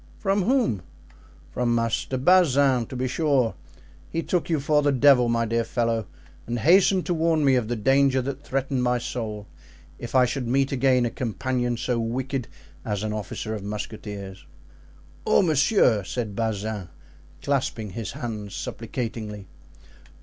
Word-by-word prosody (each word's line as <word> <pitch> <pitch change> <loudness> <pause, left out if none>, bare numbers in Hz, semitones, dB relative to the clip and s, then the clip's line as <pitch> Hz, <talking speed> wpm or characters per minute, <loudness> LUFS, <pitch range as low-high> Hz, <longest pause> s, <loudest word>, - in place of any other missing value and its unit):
"From 195 -1 +1
whom?" 240 - +1 0.7
"From 120 -1 0
Master 115 +3 -1
Bazin, 140 -6 +4
to - - -8
be 130 +1 -1
sure; 135 -5 +1 0.6
he 165 - -2
took 175 -1 -1
you 160 -3 +1
for 150 +1 +2
the 145 0 +2
devil, 130 -2 +5
my 115 0 +1
dear 115 +1 0
fellow, 115 -3 -1 0.4
and 120 +1 -2
hastened 185 - +4
to 175 - 0
warn 160 -2 +2
me 135 - +5
of 125 -4 +1
the 120 - -1
danger 135 +3 +3
that 135 +2 -4
threatened 135 -1 -1
my 125 0 +2
soul 110 -4 -5 0.5
if 120 - -7
I 130 -1 +6
should 125 0 -3
meet 135 +2 +1
again 130 -2 +3
a 120 - -2
companion 120 0 -2
so 120 0 -1
wicked 125 +2 -2 0.4
as 105 -1 -3
an 110 0 -2
officer 110 +1 -4
of 105 - -4
musketeers." 100 -2 -6 0.8
"Oh, - - +4
monsieur!" 145 - +3
said 105 0 -4
Bazin, 110 -3 -2 0.6
clasping 125 -7 -1
his 110 +1 -5
hands 105 -4 -6
supplicatingly. 110 -3 -5
125 Hz, 150 wpm, -25 LUFS, 110-140 Hz, 0.8 s, I